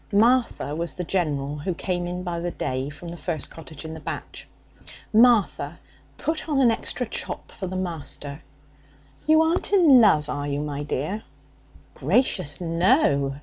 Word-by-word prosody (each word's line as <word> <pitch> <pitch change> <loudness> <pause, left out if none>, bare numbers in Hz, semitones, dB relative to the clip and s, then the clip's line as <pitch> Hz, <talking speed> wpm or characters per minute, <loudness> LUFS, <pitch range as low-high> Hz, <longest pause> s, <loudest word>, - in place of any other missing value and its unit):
(Martha 230 - +2
was 170 +1 -3
the 180 - -3
general 150 -5 -1
who 175 +4 -2
came 175 0 -2
in 180 +1 -4
by 175 -2 -3
the 175 +1 -2
day 130 -4 -3
from 155 +3 -9
the 170 - -7
first 160 -5 -3
cottage 160 -1 -10
in 160 - -6
the 160 - -7
batch) - - -7 0.7
'Martha, 215 -9 +4 0.4
put 315 0 -2
on 285 -3 +2
an 245 -4 +5
extra 250 +2 -2
chop 225 - -4
for 190 - -6
the 185 - -5
master. 160 -5 -4 0.9
You 315 +1 +6
aren't 330 +4 0
in 320 -11 +7
love, 150 -9 +4
are 145 -1 -3
you, 140 0 -1
my 145 -1 -4
dear?' 150 +8 -2 0.7
'Gracious, 180 - +1
no! 165 - +2
175 Hz, 160 wpm, -24 LUFS, 150-220 Hz, 0.9 s, in